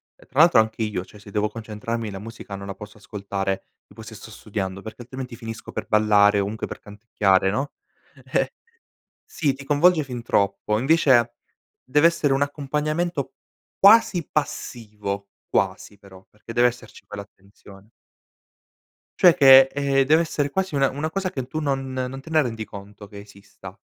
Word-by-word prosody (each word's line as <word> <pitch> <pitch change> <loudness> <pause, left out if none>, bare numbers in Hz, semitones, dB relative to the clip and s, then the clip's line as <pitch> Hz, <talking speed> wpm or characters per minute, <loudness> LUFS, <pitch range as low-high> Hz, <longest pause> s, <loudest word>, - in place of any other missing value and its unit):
ehm, - - -22
tra 135 - -3
l'altro 165 -6 +7
anche 110 0 0
io 105 -4 -3
cioè, 105 - -16
se 100 0 -14
devo 105 +1 0
concentrarmi 110 0 -5
la 95 - -7
musica 110 -2 -9
non 100 0 -8
la 100 - -6
posso 105 +1 -12
ascoltare, 100 -2 -4 0.2
tipo 110 - -13
se 110 0 -11
sto 110 - -11
studiando, 95 -3 -5
perché 110 +2 -9
altrimenti 125 0 -8
finisco 115 -2 -8
per - - -5
ballare, 105 -1 +4
comunque 100 +2 -3
per - - -8
canticchiare, 100 -2 0
no? 135 +8 -2 0.6
Eh. - - +1 0.7
sì 155 -6 -1
ti 140 +1 -11
coinvolge 155 +4 +3
fin 125 -3 -7
troppo 100 -1 0
invece 130 -4 +3 0.5
dev'essere 150 +1 +3
un 135 - +1
accompagnamento 150 +2 -2 0.4
quasi 200 -5 +5
passivo, 105 -8 -4 0.2
quasi 95 +1 -2
però, 95 -2 -16
perché 105 +2 -11
deve 120 +1 +5
esserci 120 0 -11
poi 105 - -9
l'attenzione. 100 0 -15 1.3
Cioè 175 -2 +7
che, 135 -1 +8
ehm, 140 -1 +1
dev'essere 155 -1 +2
quasi 190 +2 -2
una 135 -1 +3
una 150 +4 -3
cosa 195 +1 -2
che 130 -7 -5
tu 155 +4 -5
non 135 -3 -2
non 130 +1 -4
te 150 - -13
ne 155 - +4
rendi 115 -5 -4
conto 105 0 -11
che 100 -1 -11
esista. 100 -1 -14
115 Hz, 165 wpm, -23 LUFS, 105-140 Hz, 1.3 s, che